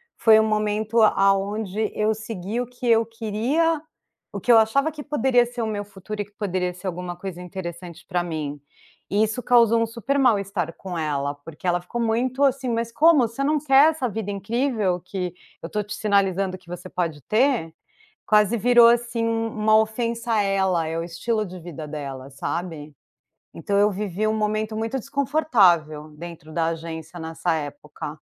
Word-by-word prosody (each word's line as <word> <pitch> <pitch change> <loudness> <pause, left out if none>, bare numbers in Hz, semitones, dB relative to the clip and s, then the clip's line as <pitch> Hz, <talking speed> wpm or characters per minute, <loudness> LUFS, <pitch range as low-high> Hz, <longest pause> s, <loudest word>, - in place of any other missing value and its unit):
foi 220 -2 +6
o - - +4
momento 215 +1 +1
aonde 200 +1 +2
eu 215 +1 +2
segui 220 +1 -4
o 245 - -4
que 245 0 -7
eu 230 -1 +4
queria, 235 +9 0 0.5
o - - -5
que 245 - +2
eu 230 - +8
achava 275 +8 +2
que 300 -1 -8
poderia 265 -4 +2
ser 240 0 -6
o - - -1
meu 205 -1 -3
futuro 205 +1 -7
e - - -4
que 205 - -26
poderia 185 -3 -2
ser 180 +2 -8
alguma 180 0 -4
coisa 180 -1 -7
interessante 175 -1 -8
pra 180 -2 0
mim. 150 -4 -4 0.5
E 205 +2 +2
isso 220 +3 -2
causou 230 -2 +5
um - - +3
super 235 +5 -2
mal 245 -6 +4
estar 185 -4 -3
com 180 -1 -7
ela, 145 -2 -1
porque 150 +4 -9
ela 175 0 +2
ficou 235 +7 -4
muito 245 +4 0
assim: 270 -2 +2
"Mas 230 0 -1
como? 295 -1 +5
Você 230 +5 -4
não 300 +2 +2
quer 280 +2 +6
essa 300 -6 -2
vida 215 -1 -4
incrível 210 -2 -1
que 180 0 -4 0.3
eu - - -5
estou 210 +4 -2
te 205 - -7
sinalizando 195 -2 +1
que 185 - -27
você 180 +1 -8
pode 165 -5 -3
ter?". 230 -7 +1 0.6
Quase 210 +1 +4
virou 240 +2 +6
assim 235 -1 +1
uma 225 -1 +1
ofensa 230 +1 -1
a 210 -2 +3
ela, 190 -4 +1
é 160 - -3
o - - -2
estilo 210 +6 -2
de 185 0 -9
vida 160 -3 -8
dela, 140 -3 -6
sabe. 155 +2 -5 0.6
Então 200 +5 -2
eu 205 +1 +4
vivi 205 +1 -2
um 215 - +2
momento 215 0 -1
muito 225 +4 -2
desconfortável 205 - +2
dentro 170 -1 -10
da 165 0 0
agência 165 +1 -6
nessa 160 +1 -2
época. 155 - -6
210 Hz, 180 wpm, -23 LUFS, 175-230 Hz, 0.6 s, eu